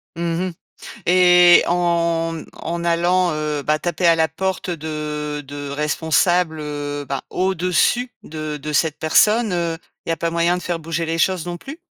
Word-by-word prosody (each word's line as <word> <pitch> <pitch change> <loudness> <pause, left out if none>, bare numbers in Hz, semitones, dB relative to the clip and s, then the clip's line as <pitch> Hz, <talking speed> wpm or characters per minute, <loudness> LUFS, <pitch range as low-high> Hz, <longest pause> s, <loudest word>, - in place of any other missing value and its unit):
Mmh 170 - -6 0.3
mh. - - -4 0.6
Et 180 -1 +6
en 170 -2 0
en 170 +1 -5
allant, 175 +1 +2
heu, 150 -1 -2
bah, 150 +1 +1
taper 175 +1 -1
à 165 - +6
la 160 -1 +2
porte 190 +3 -3
de 150 -2 -4
de 145 0 -7
responsables, 160 +3 +1
heu, 145 -1 -4
bah, 135 -1 -3
au-dessus 185 +7 +1
de 155 -1 -5
de 150 +1 -6
cette 150 0 +1
personne, 210 +7 +3
heu, 170 -2 -1 0.3
il - - -3
y - - +3
a - - -2
pas 165 +2 -2
moyen 170 +1 +1
de 180 - -6
faire 175 -1 -2
bouger 165 +1 -3
les 165 +1 -2
choses 185 -1 +1
non 175 0 -4
plus? 290 - -10
165 Hz, 175 wpm, -20 LUFS, 150-175 Hz, 0.6 s, Et